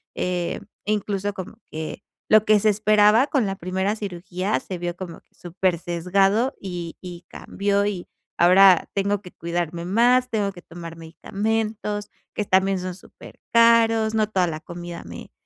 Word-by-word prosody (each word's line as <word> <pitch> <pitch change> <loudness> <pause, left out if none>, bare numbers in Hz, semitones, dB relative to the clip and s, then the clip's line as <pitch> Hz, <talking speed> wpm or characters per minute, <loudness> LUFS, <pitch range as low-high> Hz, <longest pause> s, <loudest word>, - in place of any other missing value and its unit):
eh, 180 -1 -2 0.3
incluso 205 -1 -1
como 185 -3 -8
que 160 +5 -6 0.3
lo 215 0 +6
que 215 -1 +5
se 215 +1 +3
esperaba 215 +4 +4
con 265 -8 +1
la 195 - -2
primera 190 +4 -1
cirugía 185 -1 -3
se 185 -3 -7
vio 175 0 -3
como 175 -3 -8
súper 180 0 -1
sesgado 195 - +1
y 175 -3 -6
y 175 -1 -9
cambió, 200 0 -1
y 195 -4 -3 0.3
ahora 185 +1 +6
tengo 200 0 0
que 180 -3 -12
cuidarme 170 0 -3
más, 245 +6 +3
tengo 205 -3 0
que 175 - -13
tomar 165 -1 -9
medicamentos, 210 +5 -3 0.2
que 210 - -2
también 190 0 +2
son 180 -1 -5
súper - - -15
caros, 225 -1 +5
no 215 -1 +2
toda 185 -4 +1
la 155 -1 -4
comida 175 0 -8
me - - -10
195 Hz, 155 wpm, -23 LUFS, 175-210 Hz, 0.3 s, lo